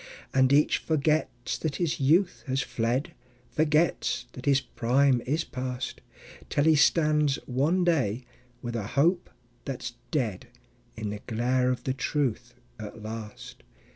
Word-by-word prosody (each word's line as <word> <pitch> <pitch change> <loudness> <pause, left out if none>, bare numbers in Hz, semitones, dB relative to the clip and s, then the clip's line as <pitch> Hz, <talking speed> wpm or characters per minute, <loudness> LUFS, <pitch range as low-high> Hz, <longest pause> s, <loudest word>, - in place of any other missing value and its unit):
And 130 0 +4
each 145 +2 +4
forgets 150 -5 0
that 155 -3 -2
his 170 -4 -1
youth 170 +7 +2
has 130 +1 0
fled, 125 +10 -1 0.4
Forgets 155 -5 +1
that 130 +2 -9
his 140 -1 +5
prime 130 0 +2
is 155 +5 +1
past, 125 -2 -5 0.5
Till 145 - +1
he 160 0 +5
stands 150 -2 +3
one 150 +9 +1
day, 130 - +1 0.4
with 120 -1 -4
a 105 -3 -3
hope 175 +5 +3 0.3
that's 125 -3 -5 0.2
dead, 120 - -2 0.5
In 105 -2 -3
the 105 0 -6
glare 125 +2 +1
of 125 -1 -2
the 130 - -1
truth 130 -3 -2 0.2
at 110 0 -8
last. 110 -1 -8
130 Hz, 140 wpm, -27 LUFS, 120-150 Hz, 0.5 s, his